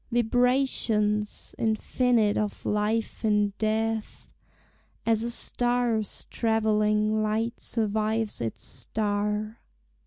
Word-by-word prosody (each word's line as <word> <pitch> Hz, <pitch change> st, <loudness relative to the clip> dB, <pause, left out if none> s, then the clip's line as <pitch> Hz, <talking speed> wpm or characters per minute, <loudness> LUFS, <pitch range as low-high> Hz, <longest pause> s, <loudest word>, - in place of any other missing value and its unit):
Vibrations 235 Hz, -3 st, +1 dB
infinite 225 Hz, 0 st, +2 dB
of 210 Hz, -1 st, -2 dB
life 215 Hz, +2 st, -1 dB
in 210 Hz, -2 st, +2 dB
death, 220 Hz, 0 st, -2 dB, 0.7 s
As 225 Hz, -1 st, +2 dB
a 235 Hz, -, -2 dB
star's 240 Hz, -3 st, -1 dB
travelling 215 Hz, -1 st, +2 dB
light 220 Hz, +2 st, -1 dB
survives 220 Hz, -, -1 dB
its 115 Hz, -1 st, -4 dB
star! 210 Hz, +1 st, -2 dB
220 Hz, 85 wpm, -27 LUFS, 210-230 Hz, 0.7 s, infinite